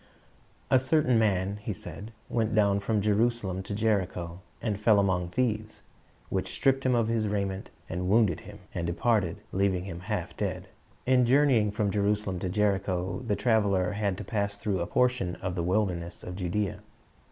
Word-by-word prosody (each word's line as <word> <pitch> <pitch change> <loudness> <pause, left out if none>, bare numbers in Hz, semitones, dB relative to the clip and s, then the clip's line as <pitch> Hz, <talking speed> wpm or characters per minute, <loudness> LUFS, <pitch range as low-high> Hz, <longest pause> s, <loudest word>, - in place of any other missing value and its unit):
"A 130 - +6
certain 130 -3 +3
man," 100 -2 +1
He 105 0 -4
said, 95 +5 -7 0.2
"went 110 -2 0
down 100 -2 +4
from 105 0 0
Jerusalem 105 -3 +1
to 100 +2 -5
Jericho, 95 -5 -1 0.2
and 105 -3 -2
fell 105 -1 +5
among 90 -3 +1
thieves, 110 +1 -2 0.5
which - - -2
stripped 135 0 +2
him 125 - +3
of 115 -2 +2
his 115 -2 0
raiment, 100 -1 -2 0.2
and 90 +1 -3
wounded 105 -5 +3
him, - - -11 0.2
and 85 -1 -2
departed, 100 0 +1
leaving 95 -2 +1
him 90 -3 -6
half 95 -2 -4
dead." - - -3 0.4
In 125 0 +4
journeying 125 -4 +4
from 105 0 0
Jerusalem 100 -2 0
to 90 - -2
Jericho, 95 -1 0
the 105 - +2
traveler 105 -5 +2
had 100 -2 -1
to 105 - -5
pass 100 0 -2
through 100 -2 -1
a 85 - -2
portion 125 -8 +1
of 90 -1 -4
the 90 - -2
wilderness 90 -2 -1
of 90 - -6
Judea. 95 +1 -2
100 Hz, 170 wpm, -28 LUFS, 95-110 Hz, 0.5 s, A